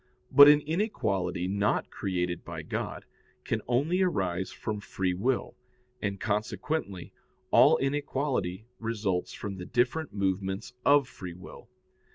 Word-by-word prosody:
But 145 +2 +10
an 150 0 +7
inequality 105 - -1
not 100 +2 0
created 90 -2 -2
by - - -7
God - - -4 0.4
can - - -1
only 145 +10 +1
arise 95 - 0
from 105 -1 -4
free 95 -2 -2
will, 120 +8 -1 0.5
and 100 -1 -2
consequently 105 - -2 0.4
all - - +7
inequality 135 -8 -1
results 105 -5 -2
from 100 -2 -6
the 90 - -6
different 130 +6 0
movements 95 +3 -2
of 145 -2 +5
free 90 -8 -8
will. 90 - -12
105 Hz, 125 wpm, -29 LUFS, 95-135 Hz, 0.5 s, But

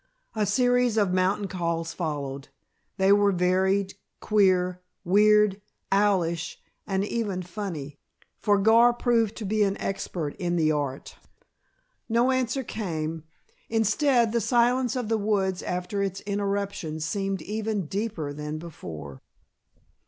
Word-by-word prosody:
A 210 -2 +1
series 245 +1 +2
of 200 -4 +2
mountain 190 +2 +1
calls 170 -3 -2
followed. 140 -5 -4 0.5
They 190 0 +4
were 205 0 +5
varied, 190 +2 +1 0.3
queer, 185 -3 +2 0.2
weird, 210 +1 +4 0.3
owlish 180 -5 +1 0.3
and 195 0 0
even 205 -5 -2
funny, 170 -7 -6 0.4
for 205 -1 +3
Gar 230 +4 +5
proved 230 -3 +1
to 220 - -6
be 215 +2 0
an 200 -1 +2
expert 170 -6 -3
in 175 -1 -1
the 155 -2 +2
art. 140 -3 -3 0.9
No 235 +3 +3
answer 260 0 0
came. 165 -8 -4 0.4
Instead, 230 +2 +2
the 235 0 +1
silence 245 +2 +2
of 250 -3 -2
the 225 0 +1
woods 195 -3 0
after 180 +3 -3
its 195 -1 -2
interruption 200 -5 -2
seemed 195 +4 -2
even 215 -2 -2
deeper 190 -5 -3
than 150 +1 -5
before. 80 - -9
195 Hz, 125 wpm, -26 LUFS, 170-215 Hz, 0.9 s, were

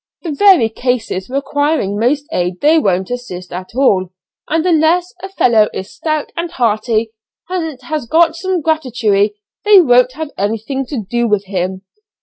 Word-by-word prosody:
the 335 - -3
very 350 - +5
cases 225 -4 -3
requiring 280 -4 -1
most 260 +7 0
aid 180 - -2
they 315 +2 +4
won't 190 - 0
assist 185 -9 -6
at 185 +1 -6
all, 195 -9 +2 0.4
and 325 +2 0
unless 345 +1 +2
a 385 - -6
fellow 230 - +3
is 190 - -6
stout 310 -2 -3
and 335 +1 -3
hearty 225 -2 0 0.4
and 325 -7 -3
has 295 -1 -4
got 325 +3 +3
some 370 0 -2
gratuity 245 -10 +1 0.3
they 415 -2 +7
won't 250 -5 +4
have 310 +1 -6
anything 225 +6 -2
to 240 -8 -4
do 240 +2 0
with 210 -2 0
him. 190 0 -3
250 Hz, 155 wpm, -16 LUFS, 210-315 Hz, 0.4 s, they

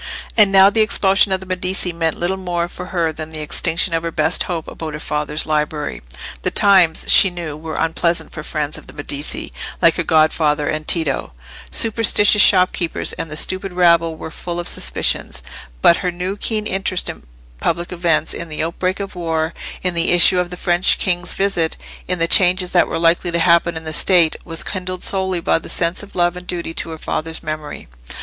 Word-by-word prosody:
And 210 -3 +5
now 195 +1 +6
the 220 - +2
expulsion 195 -2 +2
of 190 0 0
the - - -9
Medici 185 -1 -1
meant 165 -1 -1
little 175 +2 -1
more 175 -2 -3
for 180 +1 -9
her 170 -3 -1
than 155 0 -7
the 155 -1 -7
extinction 165 +3 -1
of 165 - 0
her 165 - -3
best 160 +1 0
hope 165 -3 -4
about 155 -2 -7
her - - -7
father's 150 0 -3
library. 150 - -2 0.4
The - - -1
times, 185 -5 +4
she 195 - +7
knew, 170 -4 -6
were 155 0 -7
unpleasant 165 +1 -1
for 150 - -7
friends 150 -1 -4
of - - -18
the - - -13
Medici, 145 0 -4 0.3
like - - +3
her - - 0
godfather 155 -1 +2
and 155 0 -3
Tito: 155 - -1 0.4
superstitious 210 -2 +3
shopkeepers 180 -3 +3
and 165 - -5
the 155 - -6
stupid 185 +2 -1
rabble 170 -2 +3
were 160 - -8
full 175 +1 -5
of 175 - -4
suspicions; 60 - -1 0.4
but 170 - +6
her 180 - -2
new 180 +2 -4
keen 215 0 -1
interest 190 -2 -2
in - - -5 0.4
public 170 +1 -2
events, 170 -3 0
in 170 - -7
the 155 0 -3
outbreak 185 +3 -2
of 200 -1 -6
war, 165 -2 -2 0.3
in 180 -1 0
the 170 +1 +2
issue 175 +1 +6
of 180 -1 -1
the 180 - -8
French 175 0 +2
king's 175 -2 -1
visit, 185 -5 0 0.3
in 180 - 0
the 165 0 +1
changes 180 0 +4
that 175 - +3
were - - -3
likely 170 +2 +2
to 170 - -1
happen 170 0 +2
in 160 - -7
the 155 0 -5
State, 170 -1 +4
was 165 -2 -2
kindled 185 -1 -5
solely 190 -2 0
by 165 - +1
the - - -11
sense 170 +1 +1
of 205 - -13
love 175 0 +1
and 180 0 -9
duty 170 -2 -5
to 165 - -4
her 160 - -7
father's 160 +1 -4
memory. 155 -1 -6
170 Hz, 200 wpm, -18 LUFS, 160-185 Hz, 0.4 s, she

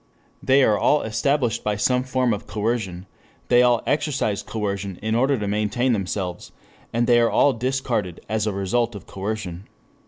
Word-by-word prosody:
They 135 +1 +4
are 105 -4 +3
all 150 - +3
established 120 +2 0
by 105 -1 0
some 125 +5 +2
form 130 -2 +1
of 100 - -6
coercion, 105 -4 -2 0.4
they 120 0 +6
all 120 -2 +3
exercise 135 -8 0
coercion 100 -3 -4
in 110 0 0
order 130 +4 +2
to 105 -2 -3
maintain 105 +5 0
themselves, 95 -3 -3 0.4
and 120 +1 +1
they 120 0 +5
are 115 -1 +3
all 140 - +4
discarded 120 -7 -2
as 110 0 -1
a - - +1
result 105 +4 -1
of 100 - -9
coercion. 100 -2 -5
110 Hz, 165 wpm, -23 LUFS, 100-125 Hz, 0.4 s, they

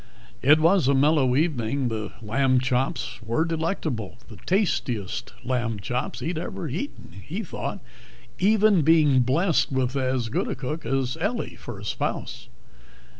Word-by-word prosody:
It 150 +4 +6
was 165 -2 +4
a 140 - +4
mellow 135 -2 +3
evening. 135 -4 0
The 110 -2 -4
lamb 130 +4 +2
chops 125 -2 -1
were 115 +8 0
delectable 160 - -2
the - - -11
tastiest 130 - -1
lamb 120 -4 -1
chops 125 +3 -3
he 135 - -2
had 170 -2 -2
ever 165 -1 -5
eaten, 175 - -6
he - - -4
thought, - - -5 0.6
even 210 -1 +4
being 150 -3 +5
blessed 155 +8 +2
with 130 0 0
as 130 -3 0
good - - -1
a - - -2
cook 135 +1 -5
as 135 +2 0
Ellie 215 +6 -2
for - - -8
a - - -9
spouse. - - -3
135 Hz, 150 wpm, -25 LUFS, 125-165 Hz, 0.6 s, It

